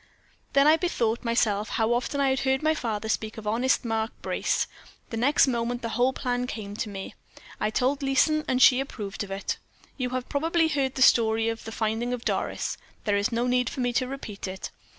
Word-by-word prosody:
"Then 275 0 +5
I 310 +2 +6
bethought 235 -11 0
myself 220 -3 +1
how 225 +1 +1
often 250 +4 -1
I 275 -1 +3
had 265 - +1
heard 265 +1 +1
my 315 0 +4
father 220 -7 -3
speak 220 0 -2
of 220 - -8
honest 240 +5 +1
Mark 225 0 -1
Brace. - - 0 0.5
The 225 - -3
next 270 +6 +4
moment 240 -1 -1
the 230 - -2
whole 245 +3 +2
plan 250 -2 -2
came 205 -4 -6
to 215 - -3
me. 195 -1 -7 0.5
I 215 - +1
told 260 +6 0
Leeson, 295 +3 +2
and 255 - +1
she 255 0 +7
approved 210 -7 -4
of 200 - -9
it. 195 +1 -3 0.4
You 255 -2 -1
have 255 0 -3
probably 325 +3 +1
heard 275 -3 0
the 260 - +4
story 225 -2 +4
of 225 0 -5
the 225 - -6
finding 225 +2 -1
of 245 -1 -5
Doris; - - -1 0.3
there 205 -2 +2
is 200 +4 +1
no 235 +1 0
need 250 -1 +2
for 260 - -4
me 245 -1 0
to 255 +2 +1
repeat 225 -7 -6
it. 190 0 -6
245 Hz, 210 wpm, -26 LUFS, 220-265 Hz, 0.5 s, she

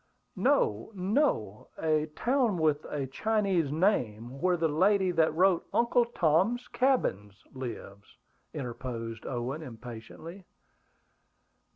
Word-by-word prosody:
"No, 105 - +1
no! 185 - 0
A 155 -1 +1
town 245 -6 +1
with 155 -2 +1
a 145 -2 -3
Chinese 190 - 0
name, 135 - 0
where 180 -1 +2
the 165 -1 +1
lady 185 +4 +3
that 165 -2 +3
wrote 185 0 +3
Uncle 240 0 +3
Tom's 215 +3 +1
Cabin 245 - +1 0.2
lives," 110 -6 -8 0.3
interposed 120 -4 -6
Owen 130 +4 -3
impatiently. 125 - -10
155 Hz, 100 wpm, -29 LUFS, 120-195 Hz, 0.3 s, lady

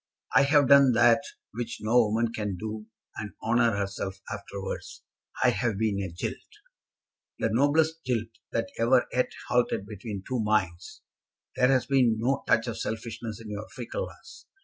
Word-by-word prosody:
I - - +7
have 145 -1 +4
done 140 -2 +7
that 120 +2 +5 0.3
which 120 +1 -5
no 110 +3 +3
woman 115 +2 0
can 105 -5 -3
do 110 +1 -6 0.3
and 105 -2 -5
honour 115 -1 +3
herself 100 -1 -3
afterwards. 100 -1 -6 0.4
I - - +6
have 115 -5 -1
been 105 -2 0
a 95 - -4
jilt." 85 - -4 1.0
"The 110 - 0
noblest 155 +6 +2
jilt 115 -3 -1 0.2
that 115 -1 -1
ever 120 +2 +4
yet 125 - +1 0.2
halted 120 -5 +1
between 100 -1 -7
two 130 -1 -1
minds! 95 -5 -1 0.5
There 125 - +4
has 130 -1 +3
been 130 -5 +3
no 130 +5 0
touch 115 - +3
of 115 -2 -4
selfishness 115 -1 -5
in 110 -2 -9
your 105 +1 -5
fickleness. - - -7
115 Hz, 155 wpm, -27 LUFS, 105-125 Hz, 1.0 s, I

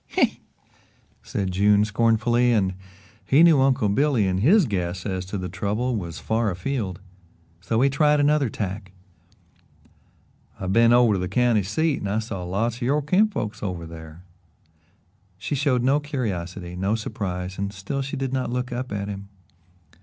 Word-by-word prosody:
"Huh!" - - +6 1.0
said 95 -2 -3
June 100 +2 +3
scornfully, 115 +3 +2
and 95 -5 +1 0.5
he 145 +5 +4
knew 160 -5 +6
Uncle 130 -5 +2
Billy 125 +1 +2
in 95 -1 0
his 175 - +5
guess 90 -4 -3
as 95 -2 -3
to 100 - -4
the 90 -1 -4
trouble 105 +7 -2
was 85 -6 -5
far 110 0 0
afield, 95 0 -3
and 90 -2 -28
so 110 +3 0
he 135 - +5
tried 150 +1 +3
another 145 -2 +2
tack. 95 -2 -5 1.7
"I've 95 0 -2
been 115 +1 +5
over 120 -2 +5
to 95 - 0
the 90 0 -3
county 120 +1 +2
seat 145 - 0
and 100 - -4
I 105 - 0
saw 105 -4 -4
lots 110 +6 -1
of - - -15
your 140 +5 +1
kinfolks 150 - 0
over 90 -5 -4
there." 80 +1 -11 1.1
She 100 - -4
showed 130 -3 +1
no 135 +3 +3
curiosity, 95 - -4
no 95 +4 0
surprise, 95 -4 -4
and 100 0 -2
still 100 +8 -4
she 135 +1 -4
did 135 -1 -3
not 130 -3 -1
look 125 +1 -3
up 125 +1 -4
at 100 -1 -3
him. 100 -1 -7
105 Hz, 170 wpm, -24 LUFS, 95-125 Hz, 1.7 s, Huh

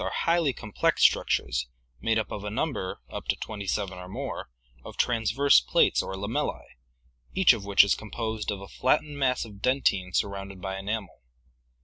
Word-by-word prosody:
192) - - -3
are - - -1
highly 165 -5 +2
complex 105 -4 0
structures - - +2 0.3
made 110 0 +1
up 110 -2 -2
of 105 - -5
a 105 - -3
number, 110 -4 -3
up - - -6
to - - +2
twenty 100 -3 -6
seven 95 -1 -2
or 90 - -8
more, - - -5 0.3
of - - -10
transverse 115 - +4
plates 60 - +3
or 95 - -5
lamella;, 100 +4 -2 0.7
each 190 -8 +6
of 110 -4 -5
which 100 -1 +6
is 100 - +3
composed 110 0 -4
of 100 -2 -3
a 100 - -9
flattened 145 +7 0
mass 130 -3 +1
of 100 -3 -13
dentine 110 -8 +1
surrounded 100 +1 -2
by 95 +1 -4
enamel. 100 - -4
105 Hz, 175 wpm, -27 LUFS, 95-120 Hz, 0.7 s, each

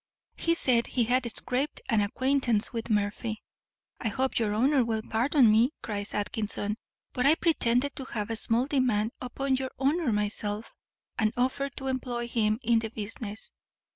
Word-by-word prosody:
He 335 0 +1
said 240 -7 +3
he 245 - +1
had 245 +1 +1
scraped 260 +6 -1
an 220 -3 +3
acquaintance 250 +1 +1
with 230 0 -4
Murphy. 215 +1 -1 0.6
"I - - -2
hope 260 +5 0
your 210 -2 0
honour 265 +4 +3
will 220 -1 -2
pardon 240 +1 +4
me," 235 +7 +4
cries 205 -1 -4
Atkinson, 210 0 -2 0.4
"but 250 +2 +2
I 305 - +6
pretended 280 -5 +1
to 265 - -4
have 215 -3 -4
a - - -1
small 230 +3 +2
demand 245 -6 +1
upon 265 +1 -1
your 260 0 -3
honour 285 0 +1
myself, 210 +1 -2 0.5
and 215 -2 +3
offered 265 +2 0
to 270 - -6
employ 250 -2 -2
him 215 -2 +1
in 230 0 +4
the 225 -1 -3
business. 215 0 -6
235 Hz, 165 wpm, -28 LUFS, 215-260 Hz, 0.6 s, I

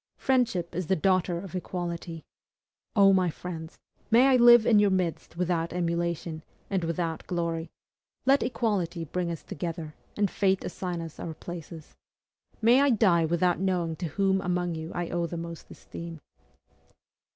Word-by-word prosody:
Friendship 230 -11 +1
is 180 -1 -3
the 190 - +3
daughter 185 0 +1
of 180 -1 -8
equality. 170 -2 -5 0.7
O 195 -2 +6
my 185 -2 +3
friends! 160 0 -7 0.3
may 245 +4 +6
I 265 - +5
live 240 -2 +8
in 220 -3 +5
your 205 -1 +4
midst 170 -3 -2
without 170 -2 -1
emulation, 170 -2 -2 0.3
and 190 -3 0
without 165 -1 -3
glory; 170 -2 -2 0.6
let 275 +2 +5
equality 205 -9 -1
bring 175 +3 -2
us 165 -2 -5
together, 165 -1 -5 0.2
and 205 -2 +1
fate 190 -1 +1
assign 180 -2 -4
us 165 -2 -9
our 160 -2 -5
places. 165 -1 -9 0.7
May 240 +4 +6
I 285 - +4
die 190 -8 +4
without 170 +2 +1
knowing 180 -4 0
to 175 - -3
whom 190 +4 +1
among 180 -1 -1
you 160 +1 -6
I 175 -1 -2
owe 170 -1 0
the 170 - -5
most 170 0 -7
esteem! 165 -1 -9
175 Hz, 155 wpm, -28 LUFS, 165-195 Hz, 0.7 s, live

